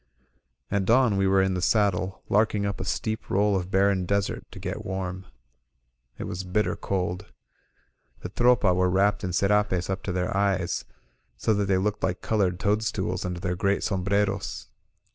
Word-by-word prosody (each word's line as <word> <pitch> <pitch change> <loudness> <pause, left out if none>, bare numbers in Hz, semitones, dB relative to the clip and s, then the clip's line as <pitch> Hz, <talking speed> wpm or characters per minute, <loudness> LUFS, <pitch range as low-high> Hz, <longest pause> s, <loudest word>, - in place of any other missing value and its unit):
At 100 -2 +1
dawn 120 -1 +4
we 95 0 +2
were 95 0 +4
in 95 0 0
the 90 - -2
saddle, 95 -2 +1
larking 105 -1 +2
up 100 -1 -3
a - - -3
steep 110 +3 -3
roll 100 +1 +2
of 90 -1 -2
barren 95 -1 +2
desert 100 0 -1
to - - -12
get - - -5
warm. 95 0 -4 0.9
It - - -5
was 95 +1 -4
bitter 95 +4 0
cold. 90 0 -3 0.9
The - - -5
Tropa 120 -3 +3
were 90 0 +2
wrapped 100 +3 +2
in 90 - -2
scrapes 100 -1 +1
up 95 - -3
to 100 - -4
their 90 +1 -1
eyes, 95 -3 0 0.5
so 110 - +1
that 100 -1 +1
they 95 -1 +2
looked 105 +2 -1
like 90 -1 -1
colored 95 -5 +1
toadstools 105 +2 -1
under 90 -1 -3
their 90 -1 -1
great 100 +2 0
sombreros. 100 +1 -1
95 Hz, 170 wpm, -26 LUFS, 90-105 Hz, 0.9 s, dawn